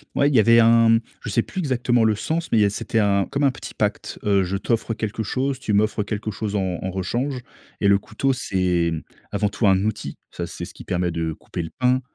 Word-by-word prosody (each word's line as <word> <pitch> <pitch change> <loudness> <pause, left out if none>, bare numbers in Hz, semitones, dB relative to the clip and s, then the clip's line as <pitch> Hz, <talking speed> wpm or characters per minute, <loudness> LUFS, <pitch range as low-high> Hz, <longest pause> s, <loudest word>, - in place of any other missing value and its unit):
Ouais, 140 +1 +4
il 145 - 0
y - - +7
avait 115 +2 +6
un 115 0 +6 0.2
Je - - -6
sais 115 - +2
plus - - -11
exactement 125 -7 +1
le 110 -1 +4
sens, 160 +10 -3
mais, 115 - +4
il - - +5
y - - +5
a - - +3
c'était 115 +2 -1
un 100 -2 +2
comme 140 - -2
un 140 - +5
petit - - -9
pacte. - - -2
Heu, 100 -2 +3
je 95 +2 -2
t'offre 115 +2 -1
quelque 110 0 -3
chose, 130 +5 -1
tu 115 -5 -2
m'offres 105 +1 +2
quelque 105 +2 -4
chose 105 0 -4
en 95 -3 -1
en 95 - -2
rechange. 120 +9 -2 0.4
Et 100 - +3
le 100 0 +6
couteau, 110 +7 -1
c'est, 90 -9 0
hem, 80 -1 -3 0.3
avant 105 0 +1
tout 105 +2 -1
un 95 -1 +4
outil. 110 - -3
Ça, - - -5
c'est - - -7
ce - - -12
qui - - -10
permet 90 -1 -1
de 80 -1 -2
couper 85 - -6
le 80 - -7
pain. 125 0 +3
110 Hz, 250 wpm, -23 LUFS, 95-120 Hz, 0.4 s, y